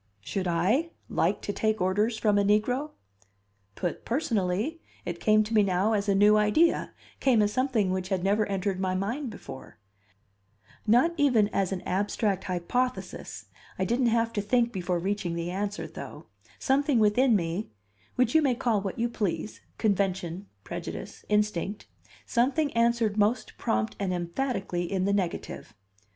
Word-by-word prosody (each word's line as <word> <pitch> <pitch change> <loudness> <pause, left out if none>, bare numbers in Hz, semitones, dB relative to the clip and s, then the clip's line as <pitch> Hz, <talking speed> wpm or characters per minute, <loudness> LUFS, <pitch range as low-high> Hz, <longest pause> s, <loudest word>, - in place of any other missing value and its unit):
Should 185 - -3
I 195 - +1 0.2
"like - - 0
to 205 - -3
take 215 +1 0
orders 205 +5 +1
from 210 -2 +2
a - - +3
negro?" 245 +8 +1 0.8
Put 175 - -3
personally, 230 - -1 0.2
it 170 -1 -4
came 215 0 +4
to 215 +2 -6
me 215 - +6
now 195 +2 +2
as 205 -1 0
a 200 - +3
new 210 +2 +6
idea 210 +11 +2 0.3
came 255 -5 +3
as 205 0 0
something 255 -7 +1
which 185 0 -2
had 190 -3 -1
never 205 +2 +2
entered 195 -1 -1
my 185 -1 0
mind 235 +9 -2
before, 135 -11 -10 1.1
not 245 +10 +4
even 245 -8 +3
as 195 -3 0
an 190 -2 -3
abstract 200 +1 -1
hypothesis 245 +9 -3 0.3
I 190 - 0
didn't 240 +4 +1
have 230 0 +1
to 205 - 0
think 235 +3 +2
before 180 -2 -1
reaching 185 -1 -2
the 170 +1 -3
answer 205 +3 -3
though; - - -9 0.3
something 280 0 +2
within 225 +3 +4
me, 175 +2 -2 0.5
which 250 -2 +2
you 320 - +6
ma 270 -5 +2
call 235 -5 +1
what 195 +2 -4
you 235 +1 +1
please 210 -3 -3 0.2
convention, 195 -3 -1 0.2
prejudice, - - -7
instinct 210 -1 0 0.4
something 280 +5 +1
answered 230 -2 +2
most 210 +4 +1
prompt 110 0 -1
and 195 -2 -1
emphatically 175 -1 -2
in 190 -1 0
the 200 - +1
negative. 185 -4 -3
210 Hz, 155 wpm, -27 LUFS, 190-235 Hz, 1.1 s, me